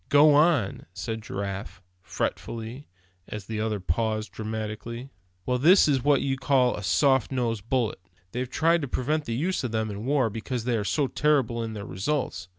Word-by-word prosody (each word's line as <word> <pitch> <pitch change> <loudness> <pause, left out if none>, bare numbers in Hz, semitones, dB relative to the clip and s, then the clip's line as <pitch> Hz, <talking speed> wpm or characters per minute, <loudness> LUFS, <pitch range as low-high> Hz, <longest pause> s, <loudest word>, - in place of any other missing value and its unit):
"Go 145 +1 +7
on!" 145 - +3
said 110 +3 -4
Giraffe, 100 -2 -5 0.2
fretfully, 115 - -4 0.4
as 105 -3 -6
the 110 0 -3
other 110 -2 -1
paused, 110 +5 -1
dramatically. 110 +3 -5 0.3
"Well, 125 0 0
this 175 +8 +6
is 135 -4 +2
what 145 -2 +4
they 135 -1 0
call 130 -2 +2
a - - -6
soft 130 +7 +3
nosed 115 -4 -2
bullet. 125 -4 0 0.3
They've 125 +1 -3
tried 165 +4 +2
to 140 - -3
prevent 145 +5 -1
the 115 - -2
use 175 +7 -1
of 125 - -2
them 110 -1 -1
in 100 +1 -6
war, 130 -5 +2
because 115 +2 -4
they 120 0 0
are 105 - 0
so 145 +8 +1
terrible 135 -5 +1
in 110 -1 -4
their 100 -1 -6
results. 125 - -2
120 Hz, 180 wpm, -26 LUFS, 110-140 Hz, 0.4 s, Go